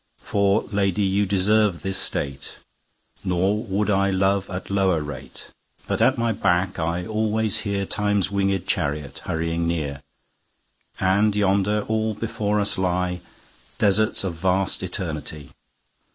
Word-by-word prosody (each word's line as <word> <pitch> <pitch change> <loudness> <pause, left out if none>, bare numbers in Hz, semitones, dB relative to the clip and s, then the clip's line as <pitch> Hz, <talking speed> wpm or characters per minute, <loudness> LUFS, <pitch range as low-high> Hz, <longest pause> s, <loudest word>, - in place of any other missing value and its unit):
For 100 +1 +1
Lady 100 -1 +1
you 100 +1 +1
deserve 100 -1 +2
this 95 0 +1
State; 70 -1 -1 0.7
Nor 95 +4 +1
would 105 0 0
I 100 0 +2
love 95 +1 +1
at 90 +1 -6
lower 95 -4 +2
rate. 70 -1 -9 0.4
But - - -1
at 130 - +4
my 115 0 +1
back 90 -2 +1
I 85 +2 -1
alwaies 110 +1 0
hearTimes 100 0 0
winged 100 -2 0
Charriot 75 -6 -2
hurrying 85 +1 -2
near:And 85 +6 -3
yonder 100 +1 +2
all 110 -1 0
before 105 -1 -1
us 100 0 0
lyeDesarts 90 +4 -1
of 95 -3 -2
vast 95 +3 0
Eternity. 80 -5 -5
95 Hz, 120 wpm, -23 LUFS, 90-105 Hz, 0.7 s, at